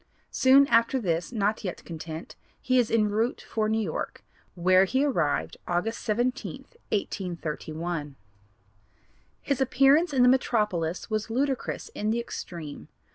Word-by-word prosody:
Soon 270 +2 +6
after 230 +1 +3
this, 170 -4 -1
not 215 -1 0
yet 185 -3 -5
content, 160 -1 -7 0.2
he 255 -1 +2
is 240 - +2
enroute 220 +2 +1
for 215 -1 -2
New 220 - +1
York, 190 -8 -4 0.3
where 185 +2 +4
he 260 +8 +1
arrived 150 - 0
August 210 +7 -1
17, 245 +4 -2 0.3
1831. 165 -5 -3 1.3
His 280 -2 -1
appearance 275 +6 +4
in 260 -3 +3
the - - +6
metropolis 210 -9 +1
was 215 +1 -1
ludicrous 265 +3 -2
in 210 - -3
the 230 +2 +1
extreme. 170 -9 -7
215 Hz, 130 wpm, -27 LUFS, 175-250 Hz, 1.3 s, Soon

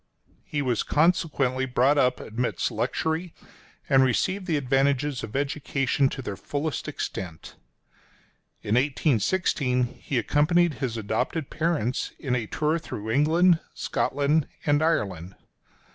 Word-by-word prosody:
He 145 -1 -3
was 125 -4 0
consequently 145 -5 +1
brought 130 +3 +3
up 125 -1 +2
amidst 120 +3 -2
luxury, 160 +2 -2 0.5
and 135 -1 +5
received 185 - 0
the 160 -4 +1
advantages 135 0 +1
of 105 - -7
education 140 -1 0
to 135 - -6
their 100 - -4
fullest 145 +7 -3
extent. 85 -4 -6 1.1
In 105 - -1
1816 130 - +1 0.2
he 135 - -2
accompanied 165 +6 +3
his 120 -4 -2
adopted 125 +8 -2
parents 155 -7 -1
in 130 -3 -1
a 115 -3 -2
tour 155 +6 0
through 110 -8 -6
England, 160 +6 +4 0.2
Scotland 145 +1 0 0.2
and 145 0 +3
Ireland. 95 - -1
140 Hz, 120 wpm, -26 LUFS, 125-155 Hz, 1.1 s, and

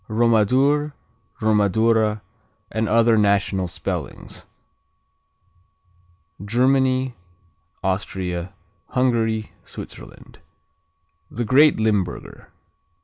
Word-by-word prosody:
Romadour, 125 +7 +2 0.5
Romadura, 110 0 +2 0.5
and 110 0 -1
other 115 0 +4
national 100 -2 +1
spellings 85 - -6 2.0
Germany, 130 +3 +1 0.7
Austria, 95 -2 -3 0.4
Hungary, 115 -4 0
Switzerland - - -12 1.0
A 120 - 0
great 140 +7 +5
Linburger. 105 -4 -2
110 Hz, 60 wpm, -22 LUFS, 100-125 Hz, 2.0 s, great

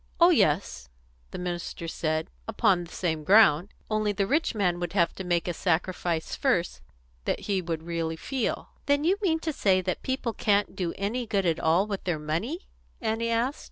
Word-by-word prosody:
"Oh 340 +1 +7
yes," 150 - +1 0.4
the - - -7
minister 175 -1 -4
said 155 -1 -2 0.2
"upon 175 -3 +2
the 170 - -15
same 160 -4 -2
ground. 195 -2 +5 0.2
Only, 215 -1 +1
the 200 0 0
rich 290 +3 +1
man 180 -4 +1
would 175 0 -3
have 170 -4 +2
to 190 - -6
make 175 -1 0
a 175 - -1
sacrifice 175 -1 -1
first 180 - 0 0.4
that - - -1
he 195 -2 0
would 165 -2 -4
really 165 -1 -2
feel." 260 - -3 0.2
"Then 285 +1 +3
you 365 +5 +3
mean 340 -6 +2
to 320 -1 -2
say 190 -7 +3
that 185 -1 -3
people 260 -3 -2
can't 205 -1 +1
do 175 -3 -2
any 225 +5 -2
good 200 -2 0
at 165 -2 +1
all 165 +5 +3
with 200 -2 -5
their 175 -4 0
money?" 170 - -3 0.3
Annie 225 0 -1
asked. 235 +5 0
190 Hz, 190 wpm, -27 LUFS, 170-225 Hz, 0.4 s, Oh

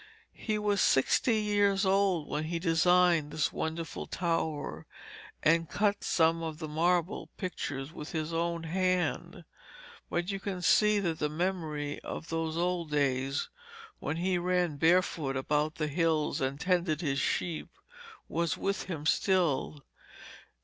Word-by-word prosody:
He 215 -2 -1
was 205 -2 +1
sixty 220 - +3
years 205 -1 +2
old 190 -5 +2
when 150 +1 -2
he 170 +2 -2
designed 170 -1 +3
this 150 - -1
wonderful 160 +1 -4
tower 165 -4 -2 0.6
and 165 0 +3
cut 205 -1 0
some 165 0 +2
of 160 -2 -4
the 160 -1 -5
marble 170 +4 0
pictures 145 -6 -4
with 150 - -8
his 160 0 -3
own 170 0 -1
hand, 185 +2 -1 0.6
but 175 +3 -1
you 195 - -3
can 190 -2 -4
see 210 +2 +4
that 165 -4 -2
the 150 - 0
memory 155 -3 -2
of 165 - -7
those 165 0 -2
old 175 -2 -1
days 135 -1 0 0.5
when 145 +3 -3
he 180 +1 +1
ran 175 -3 0
barefoot 160 -4 +2
about 150 +3 0
the 155 - -1
hills 155 -1 0
and 135 +1 -1
tended 175 -3 +1
his 140 -4 0
sheep 165 +4 -1 0.6
was 165 -2 -1
with 195 0 -2
him 160 -5 -5
still. 160 -5 +1
165 Hz, 140 wpm, -30 LUFS, 155-180 Hz, 0.6 s, see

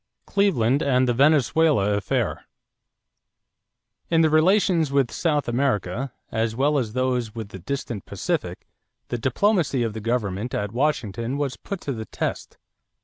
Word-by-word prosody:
=Cleveland 145 - +2
and 130 -2 +2
the 120 - +2
Venezuela 140 -4 +3
Affair.= 100 -1 -1 1.6
In 165 -1 +4
the 160 -1 +3
relations 165 -1 +3
with 140 -3 +2
South 150 -4 0
America, 120 -1 -1 0.2
as 110 0 -1
well 145 +3 +2
as 120 - -1
in 105 - -12
those 125 -3 -1
with 110 -3 -6
the 95 - -9
distant 115 0 -5
Pacific, - - -3 0.4
the 120 - -2
diplomacy 145 - +1
of 115 -2 -2
the 110 - -6
government 110 -1 -2
at 105 -1 -2
Washington 120 -2 -1
was 140 -3 -2
put 200 -3 -6
to 140 - -3
the 110 -2 -6
test. - - -4
130 Hz, 145 wpm, -24 LUFS, 110-150 Hz, 1.6 s, In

